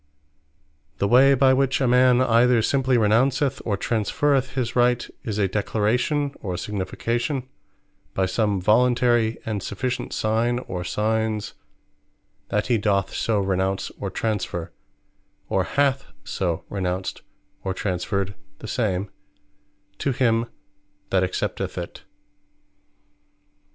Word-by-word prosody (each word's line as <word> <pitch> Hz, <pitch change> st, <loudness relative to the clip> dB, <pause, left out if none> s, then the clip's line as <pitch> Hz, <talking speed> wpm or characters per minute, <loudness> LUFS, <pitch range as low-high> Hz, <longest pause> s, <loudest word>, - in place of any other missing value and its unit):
The 100 Hz, -, +1 dB
way 135 Hz, +5 st, +6 dB
by 130 Hz, 0 st, +5 dB
which 135 Hz, +1 st, +2 dB
a 130 Hz, -, +2 dB
man 125 Hz, 0 st, +5 dB
either 120 Hz, -1 st, +4 dB
simply 130 Hz, -1 st, +2 dB
Renounceth, 130 Hz, +5 st, +2 dB
or 105 Hz, -3 st, 0 dB
Transferreth 130 Hz, +6 st, 0 dB
his 125 Hz, -3 st, -2 dB
Right, 125 Hz, 0 st, +2 dB, 0.2 s
is 105 Hz, -3 st, -3 dB
a 100 Hz, -2 st, +2 dB
Declaration, 120 Hz, +8 st, 0 dB
or 90 Hz, -3 st, -3 dB
Signification, 115 Hz, -, -2 dB, 0.7 s
by 95 Hz, -, +2 dB
some 100 Hz, +1 st, 0 dB
voluntary 120 Hz, +2 st, +3 dB
and 105 Hz, -3 st, -2 dB
sufficient 125 Hz, +7 st, -3 dB
signe, 115 Hz, +3 st, +1 dB
or 90 Hz, -8 st, -5 dB
signes, 110 Hz, +2 st, -1 dB, 1.0 s
that 105 Hz, +1 st, 0 dB
he 120 Hz, -3 st, +2 dB
doth 100 Hz, -2 st, 0 dB
so 110 Hz, -3 st, 0 dB
Renounce, 95 Hz, 0 st, -1 dB
or -, -, -3 dB
Transferre; 100 Hz, -6 st, -3 dB, 0.8 s
or 95 Hz, -1 st, +1 dB
hath 135 Hz, +1 st, +1 dB, 0.2 s
so 90 Hz, -4 st, -2 dB
Renounced, 95 Hz, -1 st, -3 dB, 0.4 s
or 95 Hz, -, -1 dB
Transferred 95 Hz, +1 st, -2 dB, 0.2 s
the -, -, -9 dB
same, 100 Hz, -4 st, -1 dB, 0.9 s
to 140 Hz, -, 0 dB
him 115 Hz, -2 st, +2 dB, 0.6 s
that 95 Hz, -1 st, +3 dB
accepteth 90 Hz, -, -3 dB
it. -, -, -7 dB
110 Hz, 115 wpm, -24 LUFS, 100-125 Hz, 1.0 s, way